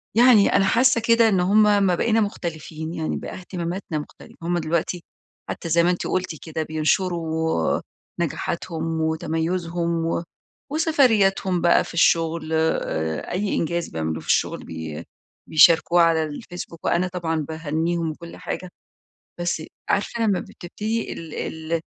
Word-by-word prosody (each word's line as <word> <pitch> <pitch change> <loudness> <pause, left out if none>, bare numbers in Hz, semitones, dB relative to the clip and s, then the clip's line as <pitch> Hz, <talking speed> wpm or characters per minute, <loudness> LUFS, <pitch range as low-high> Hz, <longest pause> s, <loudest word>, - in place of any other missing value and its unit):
يعني 235 -3 +6
أنا 195 - +4
حاسة 235 +3 +4
كده 230 0 +4
إن 195 -3 +2
هم 200 +4 +4 0.2
ما 185 -2 +3
بقينا 225 +4 +2
مختلفين 160 -5 -4
يعني 160 -2 -2
بقى - - -7
اهتماماتنا 175 -2 -4
مختلفة، - - -12
هم 175 +1 0
دلوقتي 170 +1 -1 0.5
حتى 170 - -5
زي 170 +1 +4
ما 175 - +3
أنتِ 180 - -1
قلتِ 185 -3 -1
كده 160 -1 -3
بينشروا 160 - 0 0.4
نجاحاتهم 165 -2 -2
وتميزهم، 165 +1 -1
و 165 +1 -1 0.5
وسفرياتهم 220 - +3
بقى 170 0 +4
في - - -10
الشغل 165 -1 +2
آآ، 80 - -1
أي 195 +3 -1
إنجاز 170 +1 -1
بيعملوه 80 0 -3
في - - -15
الشغل - - +1
بي 80 -2 -6 0.5
بيشاركوه 170 +2 +6
على 165 -1 +4
الفيسبوك، 165 +2 -8
وأنا 180 +2 +2
طبعًا 175 -3 -2
باهنيهم 160 +2 -2
وكل 170 +2 -10
حاجة، 185 - -5 0.7
بس 175 -2 -1 0.3
عارفة 210 +3 0
لما 200 -4 +2
بتبتدي 215 +6 -4
ال 160 -2 -9
ال 160 +1 -3
170 Hz, 135 wpm, -23 LUFS, 160-185 Hz, 0.7 s, يعني